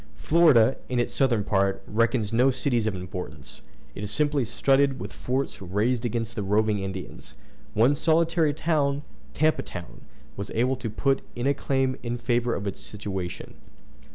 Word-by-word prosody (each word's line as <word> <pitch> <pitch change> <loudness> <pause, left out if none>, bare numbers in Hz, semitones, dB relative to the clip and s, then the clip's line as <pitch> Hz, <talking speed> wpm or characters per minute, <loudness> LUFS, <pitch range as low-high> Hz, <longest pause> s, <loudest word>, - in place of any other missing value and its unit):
Florida, 135 - +4
in 125 - -1
its 120 - 0
southern 120 -6 +2
part, 100 -1 +1
reckons 115 0 +1
no 125 +4 +4
cities 125 -3 0
of 105 - -1
importance; 90 0 -7 0.3
it 100 - -7
is 105 - -4
simply 145 +3 +1
studded 135 +3 +2
with - - -6
forts 130 -2 -3
raised 105 +6 0
against 115 0 -2
the 105 - -2
roving 105 +1 +1
Indians. 95 -1 -7 0.4
One 120 +6 +5
solitary 165 +1 +2
town, 145 -3 0 0.3
Tampa 155 +1 +2
Town, 90 -3 -8 0.3
was 100 +1 -5
able 125 +4 +2
to 120 -3 -4
put 135 +5 +1
in 120 - -3
a 140 - +4
claim 135 -1 0
in 120 0 -3
favor 120 0 0
of 100 - -4
its 100 - -4
situation. 95 -4 -5
120 Hz, 160 wpm, -26 LUFS, 105-135 Hz, 0.4 s, One